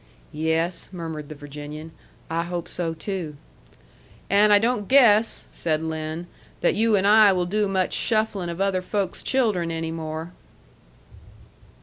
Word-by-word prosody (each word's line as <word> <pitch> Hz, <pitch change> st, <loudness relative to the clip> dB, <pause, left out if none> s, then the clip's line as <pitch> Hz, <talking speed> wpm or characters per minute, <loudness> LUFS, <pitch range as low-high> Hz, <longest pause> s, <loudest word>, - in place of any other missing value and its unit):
"Yes," 160 Hz, +3 st, -1 dB
murmured 160 Hz, -5 st, -6 dB
the 155 Hz, -, -7 dB
Virginian, 150 Hz, +2 st, -9 dB, 0.4 s
"I 165 Hz, +1 st, -1 dB
hope 175 Hz, 0 st, -4 dB
so 165 Hz, -2 st, -3 dB
too." 165 Hz, -3 st, -5 dB, 1.0 s
"And 205 Hz, +1 st, +5 dB
I 205 Hz, -, +8 dB
don't 225 Hz, -1 st, 0 dB
guess," 230 Hz, -5 st, +4 dB
said 160 Hz, -1 st, -1 dB
Lin, 160 Hz, +1 st, -4 dB, 0.4 s
"that -, -, +3 dB
you 225 Hz, 0 st, +3 dB
and 195 Hz, -1 st, +2 dB
I 210 Hz, 0 st, +7 dB
will 180 Hz, -1 st, 0 dB
do 205 Hz, +3 st, 0 dB
much 190 Hz, -1 st, 0 dB
shufflin' 215 Hz, -5 st, 0 dB
of 170 Hz, +1 st, -6 dB
other 195 Hz, -1 st, +1 dB
folks' 195 Hz, 0 st, -2 dB
children 215 Hz, -10 st, +1 dB
any 165 Hz, 0 st, -3 dB
more." 160 Hz, +1 st, -5 dB
175 Hz, 140 wpm, -24 LUFS, 160-205 Hz, 1.0 s, I